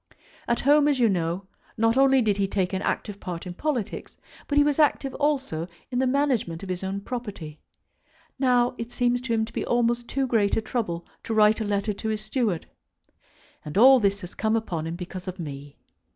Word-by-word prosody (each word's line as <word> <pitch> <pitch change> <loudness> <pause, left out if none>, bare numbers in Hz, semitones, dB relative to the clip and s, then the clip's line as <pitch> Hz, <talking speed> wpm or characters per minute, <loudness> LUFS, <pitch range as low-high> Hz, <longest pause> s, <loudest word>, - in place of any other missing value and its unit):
At 235 - +1
home, 290 +2 +5
as 285 -3 +2
you 235 - +5
know, 175 0 -1 0.3
not 225 +1 +3
only 270 -1 +5
did 205 -2 +1
he 200 -1 +1
take 190 -1 -1
an 190 - -1
active 205 0 -2
part 175 -1 -6
in 180 - -6
politics, 250 0 -3 0.3
but 290 - 0
he 290 - +7
was 295 0 +1
active 280 -2 +2
also 270 - -1 0.2
in 245 - 0
the 260 - +2
management 255 - 0
of 195 - -7
his 185 0 -3
own 195 +1 -3
property. 200 -11 -6 0.8
Now 250 -2 +3
it 230 0 -4
seems 245 0 +1
to 250 -2 -2
him 220 0 +1
to 220 - -13
be - - -2
almost 240 0 +1
too 275 0 0
great 220 -5 +2
a - - +4
trouble 215 -7 -3 0.2
to 225 - -2
write 215 +1 +4
a - - -1
letter 205 +1 0
to 220 +2 -4
his 215 -1 -2
steward; 215 -5 -1 1.0
and 150 +5 -5
all 260 +4 +8
this 200 -2 +1
has 180 -1 -9
come 220 0 0
upon 170 -8 -2
him 165 - -4
because 180 +1 -7
of 185 0 -5
me. 145 -4 -8
220 Hz, 210 wpm, -25 LUFS, 185-250 Hz, 1.0 s, all